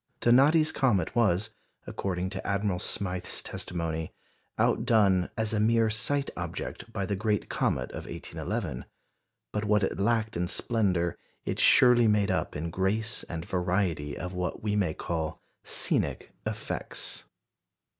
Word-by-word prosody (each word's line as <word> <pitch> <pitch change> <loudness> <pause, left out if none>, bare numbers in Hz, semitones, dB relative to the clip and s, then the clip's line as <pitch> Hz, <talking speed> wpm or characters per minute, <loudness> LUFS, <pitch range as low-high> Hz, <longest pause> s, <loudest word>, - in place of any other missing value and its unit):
Donati's 145 +6 +5
comet 120 -6 +1
was, 110 -2 +2 0.3
according 95 -1 -3
to - - -5
Admiral 100 -2 0
Smyth's 90 -1 -2
testimony, 80 -2 -4 0.5
outdone 95 -6 +3
"as 110 0 +1
a 105 - +1
mere 115 0 +3
sight 140 +6 0
object" 115 - -5
by 100 -4 -2
the 100 - -1
great 105 +1 -1
comet 65 - 0
of - - -7
1811; 90 - -4 0.7
but 105 - -1
what 105 -1 +3
it 95 - -1
lacked 110 +1 +1
in 85 +1 0
splendour, 90 -6 +1 0.3
it - - -2
surely 120 -2 +6
made 105 -2 +3
up - - -1
in 80 +3 -3
grace, 105 +5 0
and 80 0 -4
variety 90 -5 -1
of 90 +1 -5
what 90 +2 -3
we 105 -1 0
may 90 -7 +1
call 80 -2 -3 0.2
"scenic" - - 0 0.2
effects. - - -4
100 Hz, 135 wpm, -28 LUFS, 90-110 Hz, 0.7 s, surely